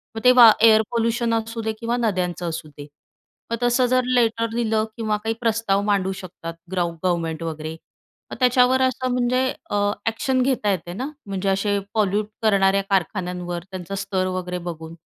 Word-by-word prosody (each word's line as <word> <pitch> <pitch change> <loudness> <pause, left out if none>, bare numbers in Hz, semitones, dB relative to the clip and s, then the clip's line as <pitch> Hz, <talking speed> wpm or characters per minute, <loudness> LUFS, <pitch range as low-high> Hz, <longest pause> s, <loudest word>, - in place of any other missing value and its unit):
मग 225 - -5
ते 250 - +8
वा 240 -3 +9
एअर 220 -1 +7
पोल्यूशन 230 0 0
असू 225 0 -2
दे 220 0 -1
किंवा 235 +1 -1
नद्यांचं 180 -6 -1
असू 160 -1 -5
दे. 145 0 -9 0.6
मग 230 - 0
तसं 245 +1 +3
जर 255 +1 +2
लेटर 230 -1 +2
लिहिलं 220 -2 +1
किंवा 215 -2 0
काही 225 0 0
प्रस्ताव 225 -4 +1
मांडू 190 -1 +1
शकतात, 165 -2 -8 0.2
ग्रव 175 -2 0
गव्हर्मेंट 165 -2 -1
वगैरे. 160 -1 -5 0.6
मग - - -6
त्याच्यावर 250 0 +4
असं 255 0 0
म्हणजे 250 +1 +1 0.2
अ, - - -2 0.3
अॅक्शन 255 +4 0
घेता 250 -5 +1
येते 175 -2 -3
ना. 255 +9 -4 0.2
म्हणजे 195 -1 -2
असे 200 +1 +1
पॉल्यूट 210 -1 +1 0.2
करणाऱ्या 195 -2 +3
कारखान्यांवर 180 -2 -2
त्यांचा 185 +1 -6
स्तर 195 -1 -1
वगैरे 180 -1 -3
बघून. 160 0 -8
210 Hz, 165 wpm, -22 LUFS, 185-235 Hz, 0.6 s, वा